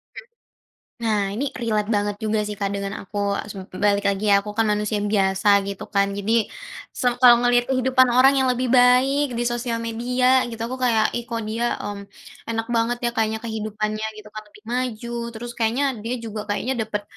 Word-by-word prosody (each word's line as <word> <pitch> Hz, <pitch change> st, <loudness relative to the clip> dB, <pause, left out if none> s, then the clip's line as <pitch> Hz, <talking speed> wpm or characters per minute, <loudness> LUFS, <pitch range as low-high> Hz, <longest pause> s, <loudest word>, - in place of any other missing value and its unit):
Mhm. -, -, -9 dB, 0.8 s
Nah, 210 Hz, -3 st, +1 dB
ini 245 Hz, +8 st, -3 dB
relate 220 Hz, -3 st, -1 dB
banget 205 Hz, -1 st, 0 dB
juga 215 Hz, 0 st, +1 dB
sih 210 Hz, -, -5 dB
Kak 200 Hz, -1 st, -2 dB
dengan 200 Hz, +1 st, -4 dB
aku 205 Hz, +2 st, -6 dB, 0.3 s
sup 190 Hz, -2 st, -9 dB, 0.2 s
balik 200 Hz, 0 st, +2 dB
lagi 200 Hz, +1 st, +1 dB
ya, 200 Hz, -, +6 dB
aku 210 Hz, +1 st, -7 dB
kan 225 Hz, -, +3 dB
manusia 210 Hz, +1 st, -1 dB
biasa 200 Hz, 0 st, +3 dB
gitu 200 Hz, -1 st, -6 dB
kan. 200 Hz, -1 st, +1 dB
Jadi, 220 Hz, +3 st, +1 dB, 0.5 s
sam 245 Hz, -2 st, +3 dB
kalau 245 Hz, -1 st, +8 dB
ngeliat 245 Hz, 0 st, +3 dB
kehidupan 260 Hz, 0 st, +3 dB
orang 265 Hz, +2 st, +7 dB
yang 260 Hz, -, +2 dB
lebih 250 Hz, 0 st, 0 dB
baik 255 Hz, +2 st, +4 dB
di 240 Hz, -, -1 dB
sosial 240 Hz, 0 st, -1 dB
media 250 Hz, +3 st, +1 dB
gitu 230 Hz, -, -7 dB
aku 255 Hz, +2 st, -5 dB
kayak, 225 Hz, -4 st, +2 dB
"Ih 240 Hz, 0 st, -4 dB
kok 230 Hz, -2 st, -3 dB
dia, 230 Hz, +3 st, -1 dB
mmm, 200 Hz, -1 st, -6 dB, 0.4 s
enak 225 Hz, 0 st, -2 dB
banget 230 Hz, +1 st, +1 dB
ya, 240 Hz, -, +2 dB
kayaknya 220 Hz, -2 st, 0 dB
kehidupannya" 215 Hz, -1 st, -3 dB
gitu 215 Hz, 0 st, -11 dB
kan, 215 Hz, 0 st, -7 dB
lebih 210 Hz, 0 st, -19 dB
maju, 240 Hz, -2 st, -3 dB, 0.2 s
terus 240 Hz, +2 st, -6 dB
kayaknya 235 Hz, +5 st, +1 dB, 0.2 s
dia 230 Hz, +4 st, -3 dB
juga 220 Hz, -1 st, -5 dB
kayaknya, 205 Hz, +5 st, -1 dB, 0.2 s
dapet 210 Hz, -1 st, -3 dB
225 Hz, 190 wpm, -22 LUFS, 210-245 Hz, 0.8 s, kalau